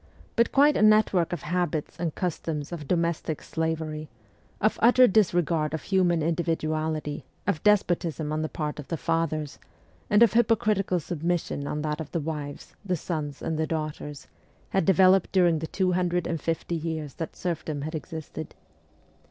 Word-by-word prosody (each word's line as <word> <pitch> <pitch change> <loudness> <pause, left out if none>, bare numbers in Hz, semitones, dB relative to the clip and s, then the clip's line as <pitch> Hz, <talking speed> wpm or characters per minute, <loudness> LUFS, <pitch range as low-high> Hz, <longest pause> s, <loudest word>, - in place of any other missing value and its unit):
But 235 0 +3
quite 290 +2 +5
a - - +1
network 215 -5 +4
of 175 -4 -4
habits 170 -2 -2
and 165 -3 -2
customs 160 -4 -3
of 155 -5 -6
domestic 170 -2 0
slavery, 160 -2 -3 0.5
of 215 - +1
utter 250 +2 +7
disregard 175 -7 +2
of 160 - -6
human 175 -4 +2
individuality, 155 -2 -1 0.2
of 155 - 0
despotism 170 -7 +1
on 155 - -1
the 155 - -2
part 150 -1 -4
of 150 - -8
the 165 - -2
fathers, 155 -2 -1 0.5
and 210 +2 +6
of 230 - +4
hypocritical 215 -5 +2
submission 165 -3 -2
on 150 0 -3
that 150 +1 -2
of 155 - -7
the 170 - +1
wives, 150 -2 -5
the 185 -3 -1
sons, 150 -4 -4
and 160 -1 -2
the 160 - 0
daughters, 155 -2 -4 0.4
had 190 -4 +1
developed 190 0 +5
during 175 -4 +4
the 160 - -4
two 185 +1 0
hundred 180 -1 0
and 165 -3 -2
fifty 165 +1 -2
years 160 -3 -3
that 165 - -6
serfdom 155 -4 -3
had 155 +2 -4
existed. 160 -1 -6
165 Hz, 160 wpm, -26 LUFS, 155-180 Hz, 0.5 s, utter